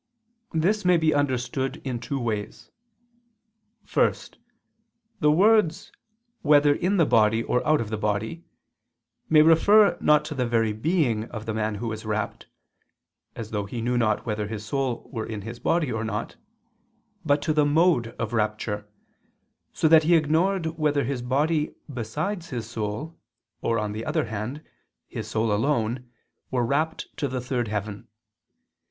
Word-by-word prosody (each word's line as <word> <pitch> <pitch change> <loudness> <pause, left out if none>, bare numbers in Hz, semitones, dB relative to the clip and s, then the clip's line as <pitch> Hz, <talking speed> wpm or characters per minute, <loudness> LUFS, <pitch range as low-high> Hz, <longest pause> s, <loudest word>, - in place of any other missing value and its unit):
This 195 +7 +1
may 180 -1 +4
be 160 -1 +2
understood 135 -1 -1
in 125 -3 -3
two 135 +3 -4
ways. 110 -4 -4 1.1
First, - - 0 0.8
the 150 -1 +4
words 195 0 +3 0.5
"whether 145 -1 +5
in 185 +7 0
the 165 - +4
body 110 -1 +3
or 125 - 0
out 155 0 +4
of 115 -2 -4
the 110 - -2
body" 105 +9 -2 0.9
may 155 -1 +7
refer 200 +7 +5
not 150 0 +4
to 150 - -5
the 125 -4 -1
very 115 -2 +1
being 120 - 0
of 110 -2 -8
the 110 - -3
man 110 -1 -1
who 115 +3 -4
was 110 0 -6
rapt 110 0 -3 0.9
(as 110 -2 -7
though 105 -2 -2
he 120 +3 -5
knew 120 +2 -1
not 110 -3 +1
whether 105 -2 -2
his 110 0 -6
soul 130 +1 -2
were 110 -3 -3
in 105 -3 -6
his 115 +3 -7
body 155 +1 +1
or 110 0 -2
not), 110 0 -4 0.9
but 145 -2 +2
to 155 - +1
the 150 -1 +3
mode 150 -4 +3
of 115 -1 -3
rapture, 105 -1 -2 0.8
so - - +1
that 160 0 +7
he 170 +2 +4
ignored 165 +4 +2
whether 150 -2 +2
his 130 0 -3
body 150 +5 0 0.2
besides 165 - -4
his 120 -4 -4
soul, 115 +8 -5 0.4
or, 115 - 0
on 105 -1 -2
the 110 +2 -5
other 155 +1 0
hand, 115 +7 -5 0.4
his - - -6
soul 110 -1 0
alone, 120 +1 0 0.4
were 125 -2 0
rapt 155 +6 -2
to 140 - -1
the 130 -1 -3
third 125 -1 -2
heaven. 105 -1 -4
125 Hz, 160 wpm, -25 LUFS, 110-155 Hz, 1.1 s, may